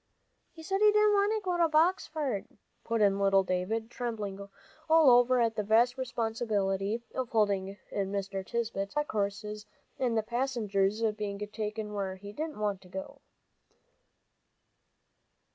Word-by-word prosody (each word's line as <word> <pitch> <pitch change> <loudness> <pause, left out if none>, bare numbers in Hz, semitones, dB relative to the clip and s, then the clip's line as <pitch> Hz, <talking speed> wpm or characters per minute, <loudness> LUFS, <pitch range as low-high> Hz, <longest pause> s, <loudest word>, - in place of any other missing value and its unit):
"He 325 - -12
said 390 +4 -1
he 425 0 +7
didn't 425 0 +4
want 405 +1 +3
to 435 -1 0
go 360 -1 0
to 335 -1 +3
Boxford," 310 - +1 0.4
put 230 -1 -1
in 200 -1 +3
little 195 -1 +4
David, 200 +6 -2
trembling 215 -5 -4 0.5
all 320 -4 +7
over 245 +1 +5
at 230 -1 +2
the 215 - 0
vast 230 +4 +3
responsibility 225 -4 -1
of 255 -2 -3
holding 200 -3 +1
in 195 -1 -2
Mr. 195 -1 -3
Tisbett's 215 -1 -3
black 295 0 -1
horses, 210 +1 -3 0.3
and 240 -3 +1
the 220 - +1
passenger's 220 -4 0
being 205 -2 -4 0.2
taken 215 -1 -4
where 195 -2 -3
he 200 +2 -10
didn't 310 +5 -4
want 205 -3 -1
to 185 - -16
go. 285 +5 -7
220 Hz, 145 wpm, -30 LUFS, 200-260 Hz, 0.5 s, he